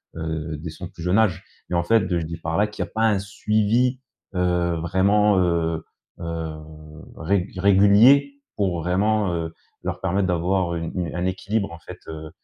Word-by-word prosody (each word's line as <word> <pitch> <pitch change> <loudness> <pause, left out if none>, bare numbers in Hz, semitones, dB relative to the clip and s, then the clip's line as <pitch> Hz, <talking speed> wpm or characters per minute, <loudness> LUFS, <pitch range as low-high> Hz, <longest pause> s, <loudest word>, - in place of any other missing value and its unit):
heu, 80 -1 -4
dès 80 +2 -6
son 85 +3 -8
plus 85 - -11
jeune 90 +4 +2
âge. 105 -7 +2 0.3
Et - - -4
en 85 - +2
fait, 100 +1 +3
je 90 - +1
dis 85 +1 -6
par 80 0 -3
là 105 - +4
qu'il 105 -3 -4
y 90 - -6
a - - -22
pas 110 0 0
un 105 -3 +2
suivi, 110 +5 +1 0.4
heu, 90 -1 +1
vraiment, 95 +5 +2
heu, 85 -2 0 0.3
heu 80 -1 -4 0.6
régu 95 +2 -1
régulier 105 +9 +6 0.2
pour 95 -4 0
vraiment, 100 +2 +1
heu, 80 -1 -3 0.3
leur - - -3
permettre 95 +1 0
d'avoir 90 0 0
une 85 -1 -4
une 85 -1 -3
un 90 - -1
équilibre 100 +2 -1
en 85 - -10
fait, - - -10
heu, 80 -1 -7
90 Hz, 185 wpm, -23 LUFS, 85-100 Hz, 0.6 s, régulier